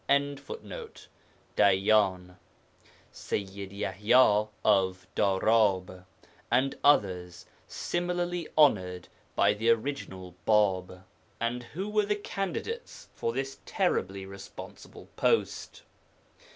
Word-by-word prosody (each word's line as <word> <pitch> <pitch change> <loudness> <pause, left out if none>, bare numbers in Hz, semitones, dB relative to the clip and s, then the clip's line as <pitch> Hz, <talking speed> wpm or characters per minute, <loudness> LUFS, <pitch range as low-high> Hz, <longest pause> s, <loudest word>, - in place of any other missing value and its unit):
] - - -36
(Dayyan), 110 - 0 0.7
Sayyid 100 -1 -5
Yaḥya 105 +3 +3 0.2
(of 95 -3 +2
Darab), 95 -2 +2 0.4
and 130 +3 +2
others 90 -10 +2 0.2
similarly 175 -1 -2
honoured 90 - +3 0.3
by - - +4
the 110 +2 0
original 110 -7 -1
Bāb. 95 -4 +2 0.4
And 120 +1 -1
who 175 +11 -6
were 210 -1 +1
the 210 - +1
candidates 205 - -5
for 115 - -2
this 135 +2 -4
terribly 95 +1 -1
responsible 100 0 -11
post? - - 0
105 Hz, 85 wpm, -29 LUFS, 95-140 Hz, 0.7 s, by